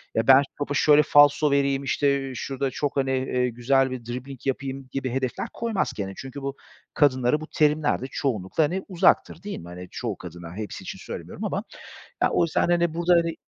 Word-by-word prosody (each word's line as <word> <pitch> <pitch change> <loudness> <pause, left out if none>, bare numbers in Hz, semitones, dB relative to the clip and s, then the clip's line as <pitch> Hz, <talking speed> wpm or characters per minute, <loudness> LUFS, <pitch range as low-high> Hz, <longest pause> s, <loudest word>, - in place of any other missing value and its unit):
"Ya, 110 0 +1
ben 135 0 +8 0.2
topa 145 0 -3
şöyle 150 +1 +5
falso 145 +1 +5
vereyim", 140 -1 +1
işte, 140 -1 0
"şurada 135 +2 -3
çok", 145 +2 -2
hani, 135 -1 +1
eee, 130 -1 0
"güzel 130 +3 +1
bir 125 -2 -6
dribbling 125 +2 -7
yapayım." 135 0 -3
gibi 135 -2 -3
hedefler 130 -1 -2
koymaz 215 - -1
kendine. 95 -2 -4
Çünkü 135 +1 -8
bu, 135 0 -4 0.4
kadınlara 130 0 +2
bu 155 - -7
terimler 150 -3 +2
de - - -4
çoğunlukla, 110 - 0
hani, 175 +6 -1
uzaktır, 175 -2 +2
değil 205 - -5
mi? 85 - -11
Hani, 90 +1 -9
çoğu 115 -6 -4
kadına, 85 -1 -9
hepsi 105 -3 -6
için - - -7
söylemiyorum - - -8
ama. - - -2 0.6
Ya, - - +4
o - - +3
yüzden, 165 - +1
hani, 170 -2 +2
burada, 170 +2 +2
hani 170 -1 +1
135 Hz, 190 wpm, -25 LUFS, 125-150 Hz, 0.6 s, ben